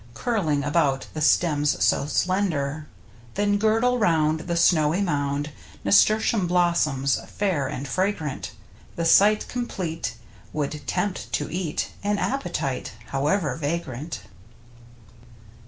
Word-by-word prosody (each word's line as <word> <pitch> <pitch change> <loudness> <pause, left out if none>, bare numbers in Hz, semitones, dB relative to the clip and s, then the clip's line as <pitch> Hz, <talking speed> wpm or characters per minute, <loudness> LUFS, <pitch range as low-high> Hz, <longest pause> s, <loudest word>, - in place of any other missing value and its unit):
Curling 160 - 0
about 145 -3 +1
the 155 - -4
stems 150 -2 +2
so 140 - +2
slender. 155 -5 -1 0.5
Then 205 0 +1
girdle 225 +4 +2
round 160 -6 +2
the 170 +1 -3
snowy 165 -1 +3
mound 145 -5 -1 0.3
Nasturtium 200 - +4
blossoms, 170 -6 +2
fair 180 -10 -1
and 140 0 -5
fra 185 +7 +1
grant, 155 -8 -6 0.4
The 170 - -2
sight 205 +5 +5
complete 170 - -4 0.4
would 150 0 -3
tempt 205 -3 -2
to 145 +1 -1
eat 175 -4 -2
An 205 0 0
appetite 170 - -2 0.2
however 145 +1 0
vagrant. 155 -1 -4
165 Hz, 110 wpm, -24 LUFS, 145-200 Hz, 0.5 s, sight